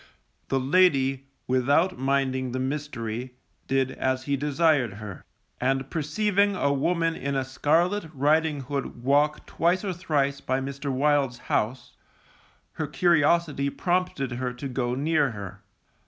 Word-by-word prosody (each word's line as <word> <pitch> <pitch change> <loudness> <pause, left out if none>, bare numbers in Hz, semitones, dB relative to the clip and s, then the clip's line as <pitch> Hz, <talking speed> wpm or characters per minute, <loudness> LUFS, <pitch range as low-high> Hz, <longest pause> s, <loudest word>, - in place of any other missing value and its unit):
The 135 - +1
lady, 135 -3 +3 0.2
without 140 +8 +2
minding 130 -1 0
the 130 - -2
mystery, 130 -3 -4 0.3
did 135 -1 +1
as 130 0 -1
he 140 +1 0
desired 145 -4 +2
her, 105 -2 -9 0.4
and 135 +1 0
perceiving 200 +6 +1
a 140 -5 +1
woman 165 +4 +1
in 140 0 -3
a 135 -1 0
scarlet 165 +9 +1
riding 150 +1 +1
hood 135 -2 -5
walk 145 +3 +2
twice 175 +4 0
or 190 - -1
thrice 145 -6 -1
by 130 +1 -1
Mr. 140 +1 -4
Wild's 140 -2 +1 0.2
house, 125 +4 -1 0.8
her 155 - -4
curiosity 150 -1 +2
prompted 175 -5 -1
her 125 0 -3
to 125 +3 -6
go 125 -1 -2
near 145 -2 +1
her. 100 -3 -8
140 Hz, 135 wpm, -26 LUFS, 130-155 Hz, 0.8 s, lady